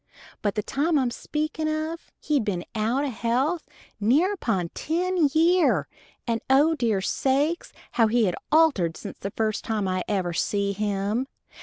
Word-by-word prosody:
But 205 -2 -1
the 210 - -1
time 305 +7 +1
I'm 255 -3 +1
speakin' 310 +4 -3
of 315 +2 -3
he'd 290 -5 +1
been 185 -5 -2
out 230 +6 0
o' 275 - -2
health 255 +9 -1 0.3
nigh 275 - +3
upon 195 - -1
ten 345 - 0
year, 335 +3 +3 0.4
and 230 -1 -1
O 290 +5 +5
dear 230 -9 0
sakes! 280 - 0 0.2
how 225 -2 +3
he 230 +1 +3
had 180 - 0 0.2
altered 285 - +3
since - - -8
the 195 - -4
first 215 +1 -1
time 215 -3 -1
I 185 -1 -1
ever 185 -4 -1
see 200 +4 0
him! 205 +4 -1
240 Hz, 160 wpm, -25 LUFS, 205-310 Hz, 0.4 s, O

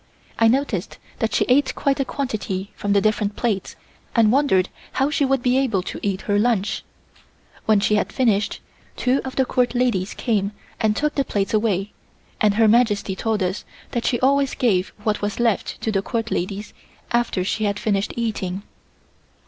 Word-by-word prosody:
I 225 - +6
noticed 235 -6 0 0.2
that 225 - 0
she - - +3
ate 260 0 +3
quite 280 0 0
a 275 - +1
quantity 210 -8 -3
from 205 -1 -1
the 200 - +4
different 210 -1 +1
plates 210 -6 -2 0.4
and 225 -3 +5
wondered 250 -9 +3 0.2
how 270 +2 +1
she 300 -2 +2
would 270 -2 +1
be 255 +1 +3
able 225 -9 +1
to - - -6
eat 195 -2 -1
her 205 -1 +1
lunch. 215 -3 +1 0.8
When 215 -2 +5
she 210 +1 +2
had - - -1
finished, 220 -6 +1 0.3
two 255 +2 +1
of 260 -1 -6
the 265 - +2
Court 250 -1 +1
ladies 230 -6 0
came 210 -4 0 0.3
and 215 -1 +2
took 300 +3 0
the 275 - +1
plates 200 -5 -2
away 210 -2 +1 0.5
and 210 -2 +4
Her 225 0 +5
Majesty 210 -4 +3
told 220 -1 0
us 185 +1 -2 0.3
that 240 - -2
she 240 - +1
always 275 +1 +3
gave 195 -7 +2 0.2
what 210 -1 0
was 205 +2 -2
left 230 -4 0
to 220 - -1
the 195 -2 +1
Court 225 +1 -3
ladies 195 +4 -3 0.4
after 235 -6 +1
she 215 +3 -1
had 200 0 0
finished 205 -1 0
eating. 200 -5 -2
220 Hz, 180 wpm, -22 LUFS, 200-250 Hz, 0.8 s, I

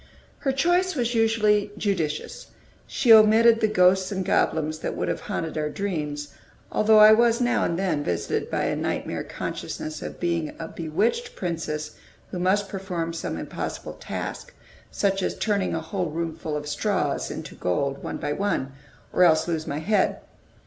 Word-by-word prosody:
Her 275 -1 0
choice 350 +6 +2
was 240 -3 0
usually 215 -2 +2
judicious; 175 -8 -2 0.4
she 245 -4 +5
omitted 225 +1 +7
the 220 - +3
ghosts 185 -1 +3
and 190 -2 -2
goblins 155 -4 +1
that - - -3
would 90 - -1
have 85 - -1
haunted 160 -1 -4
our 150 0 -1
dreams; 150 -5 -3 0.4
although 215 0 +4
I 215 0 +9
was 235 +1 +4
now 245 0 +2
and 170 - -1
then 175 -6 0
visited 85 -8 -2
by - - -1
a - - 0
nightmare - - -2
consciousness 155 -1 -5
of - - -7
being 170 -3 -1
a 165 - -6
bewitched 200 - -1
princess 165 -4 -4 0.3
who 180 - -4
must 195 +3 +2
perform 185 -4 -4
some 165 - -4
impossible - - -5
task, - - -6 0.3
such 195 -1 0
as - - -2
turning 205 -3 0
a 160 - -2
whole 175 +1 -3
roomful 160 -1 -3
of 150 0 -6
straws 150 0 -1
into - - -7
gold, 135 +10 -1
one - - -4
by 145 - -2
one, 175 -8 -1 0.4
or - - +1
else 160 -2 +4
lose 160 -2 -2
my 145 - -2
head. 200 +5 +1
185 Hz, 165 wpm, -25 LUFS, 155-215 Hz, 0.4 s, I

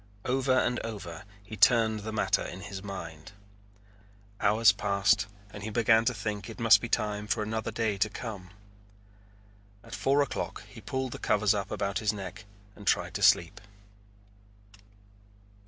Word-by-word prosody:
Over 130 +1 +1
and 125 -1 +1
over 100 -5 -7 0.2
he 110 +2 -9
turned 110 0 +4
the 110 +2 -6
matter 110 - +1
in 95 - -7
his 100 -1 -7
mind. 95 -2 -8 1.1
Hours 105 +2 +5
passed 100 +1 +1 0.3
and 105 - -8
he 110 - -4
began 115 0 +3
to 125 - +2
think 105 +1 -4
it 115 - -9
must 115 -1 +6
be 115 - -5
time 105 -1 -1
for 105 +1 0
another 110 +1 -3
day 110 -3 -1
to 110 - +2
come. 105 -5 -7 1.3
At - - -12
four 135 +8 +2
o'clock - - -5
he - - -12
pulled 130 -1 -3
the - - -7
covers 105 -1 +2
up 100 -1 -3
about 100 +1 -2
his 105 -1 0
neck 100 +1 -8 0.3
and 100 - -13
tried - - +1
to - - -4
sleep. 85 +3 +4
105 Hz, 155 wpm, -29 LUFS, 100-115 Hz, 1.3 s, must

